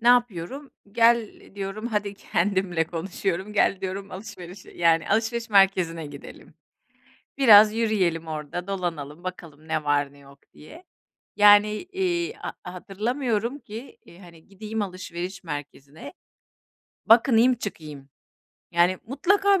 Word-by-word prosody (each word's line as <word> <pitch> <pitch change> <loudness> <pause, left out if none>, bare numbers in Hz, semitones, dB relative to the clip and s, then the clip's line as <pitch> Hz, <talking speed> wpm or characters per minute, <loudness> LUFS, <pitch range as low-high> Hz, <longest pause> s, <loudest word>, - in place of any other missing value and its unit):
Ne 235 - +2
yapıyorum, 245 - +1 0.2
"Gel, 230 -1 +4 0.2
diyorum 200 +3 -5
hadi" 205 -3 -2
kendimle 185 -3 0
konuşuyorum, 185 +3 -4
"Gel 200 -2 +2
diyorum 195 +1 -5
alışverişe, 185 -2 -10
yani, 165 -1 +2
alışveriş 230 +2 0
merkezine 185 -5 +3
gidelim. 145 -1 -12 0.8
Biraz 215 -5 +8
yürüyelim 190 -8 0
orada, 155 +3 -5
dolanalım, 170 -5 -4
bakalım 160 -4 -9
ne 155 -1 -1
var 145 -1 +1
ne 145 - -19
yok, 140 0 -17
diye." 325 - -14 0.5
Yani, 205 0 +7 0.2
iii, 365 0 -1
ha - - -7
hatırlamıyorum 230 +6 -3
ki, 245 - -10
iii, 170 - -16
hani, 170 -3 -16
gideyim 215 +2 -5
alışveriş 185 -1 -6
merkezine, 145 -1 -8 0.9
bakınayım, 235 +2 +5
çıkayım. 150 - -8 0.6
Yani, 175 +2 +2
mutlaka 390 - +2
195 Hz, 115 wpm, -25 LUFS, 170-225 Hz, 0.9 s, Biraz